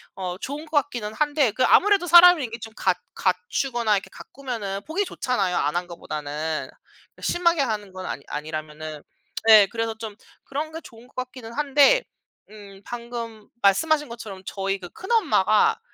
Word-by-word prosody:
어 180 -2 -4
좋은 290 +3 -6
것 320 - -8
같기는 240 -7 -6
한데 290 -1 +2
그 255 +5 0
아무래도 395 -3 +4
사람이 345 -1 +8
이게 230 0 -7
좀 225 0 -10
갖 180 - +1 0.2
갖추거나 215 +5 0
이렇게 195 - -3
가꾸면은 225 -8 -6
보기 370 +6 -1
좋잖아요 205 - -1
안 145 0 0
한 175 +1 -1
것보다는. 155 -2 -4 0.5
심하게 340 -3 +2
하는 215 -6 -2
건 185 0 -7
아니 130 +4 -5
아니라면은. 155 0 -6 0.4
네 215 -3 +8
그래서 225 +2 -3
좀 220 -2 -6 0.3
그런 300 +3 -4
게 325 +1 -7
좋은 230 -3 -15
것 - - -27
같기는 255 -2 -7
한데 295 - +4 0.5
음 200 -2 -13
방금 235 -2 -7
말씀하신 295 +9 +3
것처럼 220 -5 -8
저희 195 0 -2
그 180 -2 -9
큰엄마가 345 - +2
225 Hz, 340 characters per minute, -24 LUFS, 190-285 Hz, 0.5 s, 사람이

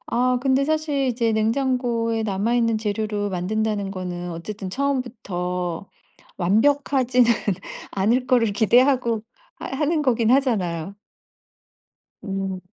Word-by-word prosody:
아 250 +1 +1
근데 270 0 +2
사실 305 -3 0
이제 230 -2 +1
냉장고에 230 0 0
남아있는 225 +3 +1
재료로 210 -1 -2
만든다는 205 +2 -1
거는 180 -2 -5
어쨌든 190 +4 -6
처음부터 190 -9 -3 0.5
완벽하지는 250 +4 +3 0.6
않을 230 +6 +1
거를 240 -5 +3
기대하고 235 +1 +3 0.3
하 - - -8
하는 300 +3 0
거긴 235 -4 +2
하잖아요. 200 - +1 1.3
음. 195 -2 -3
225 Hz, 255 characters per minute, -23 LUFS, 195-255 Hz, 1.3 s, 완벽하지는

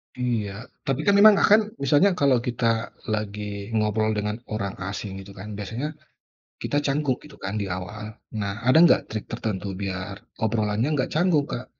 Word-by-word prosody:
Iya. 115 -4 -2 0.2
Tapi 135 +2 0
kan 200 - +4
memang 215 0 +9
akan 215 +2 +4
misalnya, 145 +8 +5
kalau 140 -6 +3
kita 115 -1 0 0.2
lagi 105 -1 -3
ngobrol 110 0 +1
dengan 105 0 -1
orang 100 -3 -3
asing, 100 -1 -5
itu 100 - -12
kan. 95 +2 -8
Biasanya 115 +8 -4 0.7
kita 145 - 0
canggung, 140 -2 +1
gitu 150 -1 -13
kan? 100 +2 -3
Di 100 -2 -1
awal. 105 +4 -7 0.4
Nah, 100 +2 -3
ada 130 +5 +4
nggak 170 - +6
trik 110 -1 -4
tertentu 105 -2 -3
biar 95 0 -4 0.3
obrolannya 110 +2 +1
nggak 130 -2 0
canggung, 160 -4 +3
Kak. 125 - -5
110 Hz, 165 wpm, -25 LUFS, 100-135 Hz, 0.7 s, memang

